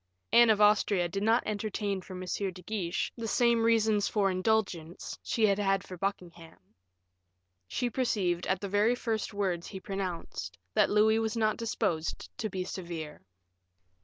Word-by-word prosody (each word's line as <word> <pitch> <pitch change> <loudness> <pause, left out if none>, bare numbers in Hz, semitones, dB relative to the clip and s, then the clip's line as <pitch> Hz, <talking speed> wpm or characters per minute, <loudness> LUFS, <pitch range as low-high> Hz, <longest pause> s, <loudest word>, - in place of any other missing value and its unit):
Anne 235 -1 +7
of 215 -1 +4
Austria 205 -3 +4
did 195 +4 -4
not 225 +3 +3
entertain 205 -2 -2
for 185 - -10
M. 180 - -6
de 185 -1 -3
Guiche 185 -3 -2
the 230 -1 -4
same 235 0 +3
reasons 220 -2 +3
for 200 -3 +1
indulgence 185 -4 -1
she 225 - +1
had 200 -1 +2
had 195 -1 +1
for 185 - -9
Buckingham. 175 -3 -5 1.1
She 245 - -1
perceived, 200 -8 0
at 190 - +1
the 200 - -3
very 205 +5 +3
first 225 -3 -2
words 190 -4 -2
he 190 - -7
pronounced, 180 - -5 0.2
that - - +4
Louis 220 +1 +4
was 225 0 -1
not 215 -1 +2
disposed 200 -8 -2
to 215 - -2
be 185 -1 -3
severe. 170 -5 -6
200 Hz, 160 wpm, -30 LUFS, 180-220 Hz, 1.1 s, Anne